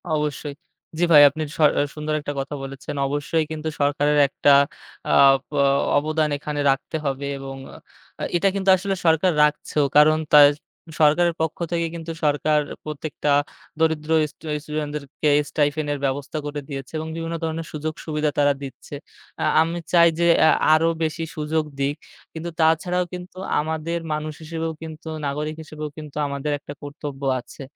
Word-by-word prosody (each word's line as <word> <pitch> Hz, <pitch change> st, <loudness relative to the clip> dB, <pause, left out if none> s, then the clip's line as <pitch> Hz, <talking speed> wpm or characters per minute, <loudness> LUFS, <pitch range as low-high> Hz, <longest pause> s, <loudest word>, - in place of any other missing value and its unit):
অবশ্যই। 150 Hz, -1 st, -2 dB, 0.5 s
জি -, -, +2 dB
ভাই, 150 Hz, -2 st, +9 dB
আপনি 155 Hz, +3 st, -7 dB, 0.2 s
স -, -, -19 dB, 0.4 s
সুন্দর 155 Hz, 0 st, -3 dB
একটা 145 Hz, -1 st, -5 dB
কথা 140 Hz, +2 st, -4 dB
বলেছেন। 135 Hz, +2 st, -7 dB
অবশ্যই 145 Hz, +3 st, 0 dB
কিন্তু 155 Hz, 0 st, -4 dB
সরকারের 145 Hz, +1 st, +2 dB
একটা 140 Hz, +1 st, +2 dB, 0.6 s
আপ 135 Hz, -1 st, +6 dB, 0.6 s
অবদান 155 Hz, +1 st, +1 dB
এখানে 150 Hz, 0 st, -5 dB
রাখতে 135 Hz, +3 st, -3 dB
হবে 140 Hz, 0 st, -2 dB
এবং 135 Hz, 0 st, -7 dB, 0.8 s
এটা 175 Hz, +3 st, +3 dB
কিন্তু 195 Hz, -1 st, 0 dB
আসলে 195 Hz, +1 st, -2 dB
সরকার 165 Hz, +3 st, +4 dB
রাখছেও। 150 Hz, 0 st, +1 dB
কারণ 155 Hz, +1 st, +6 dB, 0.2 s
তার 145 Hz, -1 st, +10 dB, 0.5 s
সরকারের 165 Hz, +3 st, +4 dB
পক্ষ 160 Hz, -1 st, -1 dB
থেকে 170 Hz, -1 st, 0 dB
কিন্তু 165 Hz, 0 st, -6 dB
সরকার 150 Hz, +1 st, +2 dB, 0.2 s
প্রত্যেকটা 150 Hz, -1 st, -3 dB, 0.5 s
দরিদ্র 160 Hz, -1 st, 0 dB, 0.2 s
স্টু -, -, -18 dB, 0.2 s
স্টুডেন্টদেরকে 150 Hz, -1 st, -3 dB, 0.2 s
স্টাইপেন্ড 145 Hz, +1 st, 0 dB
-এর 145 Hz, -1 st, -2 dB
ব্যবস্থা 140 Hz, +3 st, -3 dB
করে 145 Hz, 0 st, -4 dB
দিয়েছে 135 Hz, -3 st, -6 dB
এবং 160 Hz, -, -5 dB
বিভিন্ন 165 Hz, 0 st, -4 dB
ধরনের 165 Hz, 0 st, -3 dB
সুযোগ 155 Hz, +1 st, -4 dB
সুবিধা 150 Hz, -1 st, 0 dB
তারা 145 Hz, 0 st, +4 dB
দিচ্ছে। 135 Hz, +1 st, -8 dB, 0.5 s
আ -, -, +1 dB, 0.2 s
আমি 165 Hz, +2 st, -1 dB, 0.2 s
চাই 170 Hz, -1 st, +7 dB
যে 170 Hz, -, +3 dB, 0.2 s
আ -, -, +6 dB, 0.2 s
আরও 160 Hz, +1 st, +4 dB
বেশি 160 Hz, +1 st, -2 dB
সুযোগ 155 Hz, +1 st, -1 dB, 0.2 s
দিক। 140 Hz, +1 st, 0 dB, 0.4 s
কিন্তু 165 Hz, +1 st, -5 dB
তাছাড়াও 165 Hz, +3 st, +2 dB
কিন্তু 180 Hz, 0 st, -8 dB, 0.2 s
আমাদের 160 Hz, +2 st, -2 dB
মানুষ 155 Hz, 0 st, -3 dB
হিসেবেও 160 Hz, 0 st, -4 dB
কিন্তু, 160 Hz, 0 st, -9 dB, 0.2 s
নাগরিক 150 Hz, +2 st, -3 dB
হিসেবেও 155 Hz, -1 st, -7 dB
কিন্তু 150 Hz, -2 st, -9 dB
আমাদের 140 Hz, +1 st, -3 dB
একটা 145 Hz, -, -9 dB
কর্তব্য 145 Hz, -1 st, -7 dB, 0.2 s
আছে 120 Hz, -, -13 dB
150 Hz, 150 wpm, -23 LUFS, 145-160 Hz, 0.8 s, তার